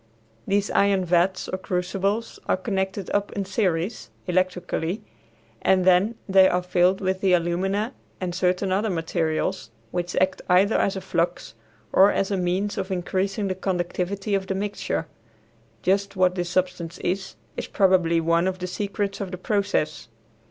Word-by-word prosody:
These 200 +1 +1
iron 200 -2 +3
vats 180 +2 +2
or 185 - -3
crucibles 195 +5 -2
are - - +2
connected 190 -1 -2
up 205 0 0
in 200 -1 -2
series, 190 0 -1 0.2
electrically, 180 +1 -1 0.6
and 185 -1 +3
then 190 +5 +4
they 190 -1 +6
are 180 0 0
filled 180 +1 +2
with 190 0 -1
the 190 -2 +3
alumina 190 +7 0 0.3
and 180 -2 -3
certain 185 +1 +1
other 205 +4 +1
materials, 165 -2 -1 0.2
which 175 0 -3
act 185 0 +1
either 190 +4 +4
as 195 - +2
a 190 - -4
flux 175 -2 -1 0.4
or 195 +2 +7
as 195 - 0
a - - +2
means 190 +4 -1
of 190 0 -3
increasing 190 +3 -1
the 190 - 0
conductivity 190 +2 -2
of 195 -1 0
the 190 - -1
mixture; 200 -4 -2 0.8
just 195 +2 +1
what 185 -1 +3
this 175 -1 -2
substance 180 -2 -1
is, 190 +2 -2 0.2
is - - -4
probably 180 -4 +3
one 170 +2 +2
of 185 0 -1
the 180 - -4
secrets 200 +1 -3
of 195 - -3
the 180 - -5
process. 200 - -1
185 Hz, 160 wpm, -24 LUFS, 180-195 Hz, 0.8 s, or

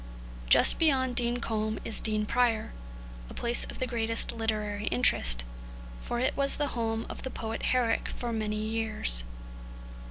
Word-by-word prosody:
Just - - +6
beyond 260 -6 +2
Dean 240 0 +1
Combe 220 -2 -3
is 225 - +1
Dean 215 -1 0
Prior, 235 -1 0 0.6
a - - -11
place 235 0 -1
of - - -9
the 255 - -2
greatest 230 -2 +1
literary 215 -2 -3
interest, 60 - +3 0.6
for 240 - -4
it 255 - 0
was 275 0 +3
the 290 -1 -1
home 225 -1 -2
of - - -8
the 260 - -5
poet 225 -2 -6
Herrick 250 -3 0
for 240 -1 -5
many 215 -1 -3
years. 215 - +1
225 Hz, 155 wpm, -28 LUFS, 215-245 Hz, 0.6 s, Just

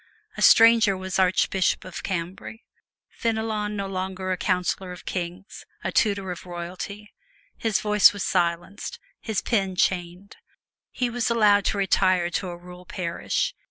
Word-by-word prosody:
A - - -6
stranger 225 -4 +6
was 190 0 -3
Archbishop 190 0 +2
of 185 -2 -7
Cambrai: 185 +4 -5 0.5
Fenelon 220 -2 -2
no 200 -1 -3
longer 190 0 -4
a - - +1
counselor 180 0 -1
of 180 - -10
kings 180 +2 -5 0.2
a - - -2
tutor 200 -3 +1
of 180 +1 -8
royalty. 180 +4 -7 0.4
His 220 -3 0
voice 210 -1 +6
was 205 -2 -5
silenced, 175 +2 -1 0.2
his 220 -3 -3
pen 195 -5 0
chained. 180 +2 -1 0.5
He 245 -2 -2
was 240 0 -1
allowed 210 -3 +4
to 205 - 0
retire 185 -2 +2
to 185 - -2
a 175 - -7
rural 180 0 -13
parish. 170 -2 -2
190 Hz, 145 wpm, -25 LUFS, 180-210 Hz, 0.5 s, stranger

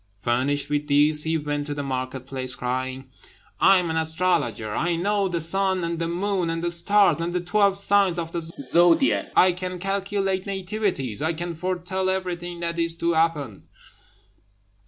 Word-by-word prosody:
Furnished 130 +6 0
with 150 0 -1
these 150 +2 +3
he 160 0 +1
went 145 -1 -3
to 145 - -3
the 145 - -3
market 130 -1 -4
place, 130 -2 0
crying, 130 +1 -3 0.5
"I 195 0 +6
am 175 -3 -1
an 160 - -1
astrologer! 160 -10 0
I 170 +8 0
know 200 +3 0
the 175 -2 -2
sun, 190 +2 +1
and 170 0 -2
the 165 - -1
moon, 180 0 -1
and 165 0 -3
the 175 - 0
stars, 200 +1 +3
and 170 +1 -2
the 180 - 0
twelve 195 +2 +2
signs 200 -3 +3
of 165 -1 -4
the 170 - -3
zodiac; 165 - +2
I 185 - +6
can 180 0 -5
calculate 195 0 -1
nativities; 190 - -2
I 160 +2 0
can 170 +1 -4
foretell 185 +2 -2
everything 175 -2 -3
that 170 0 -2
is 165 0 +1
to 170 0 0
happen!" 155 -10 -1
170 Hz, 175 wpm, -24 LUFS, 145-185 Hz, 0.5 s, I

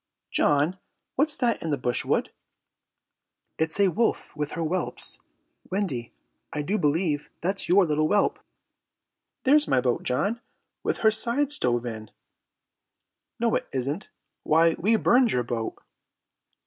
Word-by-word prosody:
"John, 150 +6 +2 0.4
what's 295 +2 +1
that 240 -3 +1
in 165 - -3
the 145 - +1
brushwood?" 125 -1 0 1.3
"It's 160 +4 -1
a 200 -1 +5
wolf 225 0 -1
with 150 0 -3
her 165 - -2
whelps. 175 +4 -1 0.5
Wendy, 170 - -2 0.4
I 150 - -2
do 205 +8 0
believe 150 0 0
that's 190 0 -1
your 190 +1 +6
little 155 -1 +1
whelp!" 205 +3 +2 1.0
"There's 295 +3 +4
my 130 - +3
boat, 125 -1 0
John, 200 - -1 0.4
with - - -2
her 220 - +7
sides 240 +6 0
stove 120 - +1
in!" 110 -3 -6 1.3
"No, 230 -1 +1
it - - 0
isn't. 140 +8 -3 0.3
Why, 165 +2 +4
we 215 +6 +3
burned 240 +2 +4
your 125 - +1
boat." 115 -1 -3
165 Hz, 135 wpm, -26 LUFS, 140-220 Hz, 1.3 s, her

